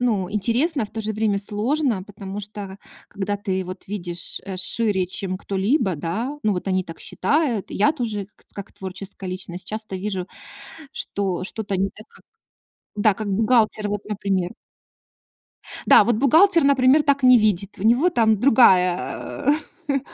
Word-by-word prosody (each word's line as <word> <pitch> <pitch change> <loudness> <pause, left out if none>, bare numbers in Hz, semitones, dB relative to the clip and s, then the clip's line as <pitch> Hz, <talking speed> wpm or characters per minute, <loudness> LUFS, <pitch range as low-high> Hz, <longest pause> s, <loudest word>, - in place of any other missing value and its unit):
ну, 210 -7 0
интересно. 235 - 0
В 205 - -11
то 225 - -5
же 215 0 -2
время 215 -1 0
сложно, 220 +3 -1
потому 200 0 -8
что 200 -1 -8 0.3
когда 205 0 -3
ты 190 -2 -2
вот 185 +1 -8
видишь, 175 -4 -4
э, 190 -1 -6
шире, 190 0 +1
чем 185 0 -4
кто-либо, 200 - 0
да- 225 - -3
ну, 215 -2 +2
вот 180 0 -4
они 185 -1 0
так 165 -1 -10
считают. 280 -9 0
Я 250 +9 +2
тоже, 220 -9 -3
как - - -25
как 200 -1 -8
творческая 190 0 -7
личность, 180 0 -5
часто 215 -2 -4
вижу, 190 -1 -3 0.7
что 190 -3 -3
что-то 200 0 -3
не 195 +1 0
как 215 - -17 0.7
Да, 210 0 +3
как 215 +1 -5
бухгалтер 215 0 +2
вот, 205 0 -3
например. 195 -3 -1 1.4
Да, - - +8
вот 240 - +1
бухгалтер, 325 - +5
например, 275 +1 +4
так 280 -2 +1
не 255 -1 +8
видит. 210 -3 0
У - - -5
него 245 +10 +4
там 220 - +2
другая, 210 -1 +3 0.4
э-э, 280 -1 +1
205 Hz, 155 wpm, -22 LUFS, 190-235 Hz, 1.4 s, Да